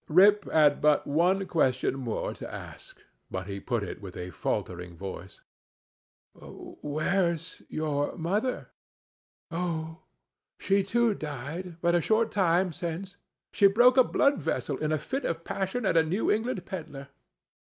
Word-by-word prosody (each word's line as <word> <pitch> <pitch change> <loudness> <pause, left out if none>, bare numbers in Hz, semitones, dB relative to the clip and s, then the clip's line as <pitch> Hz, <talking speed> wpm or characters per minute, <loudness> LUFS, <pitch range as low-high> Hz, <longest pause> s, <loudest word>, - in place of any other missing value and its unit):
Rip 200 +5 +5
had 150 -2 +4
but 150 -1 +4
one 180 +6 +2
question 130 -8 +1
more 120 -4 -3
to - - -8
ask; - - -10 0.3
but 95 -1 -4
he 100 0 -5
put 115 +1 -2
it 100 - -6
with 95 -3 -9
a 90 0 -6
faltering 90 +1 -3
voice: 95 0 -8 0.9
"Where's 165 +2 -3
your 150 -1 -1
mother?" 205 +10 -1 0.8
"Oh, 165 -1 -3 0.6
she 195 0 +2
too 235 +4 +2
had 205 - -2
died 155 +5 -6
but 170 0 +2
a 175 - +3
short 220 +5 +2
time 180 -2 +2
since; 180 +3 -5 0.4
she 200 - +6
broke 240 +5 +5
a 260 - +7
blood 280 +3 +2
vessel 145 - -1
in 155 0 -1
a 155 - +2
fit 265 - -4
of 165 0 -2
passion 195 +7 -2
at 190 - +2
a 165 - +7
New 180 +7 0
England 215 -3 -1
peddler." 145 -6 -7
165 Hz, 150 wpm, -28 LUFS, 145-195 Hz, 0.9 s, a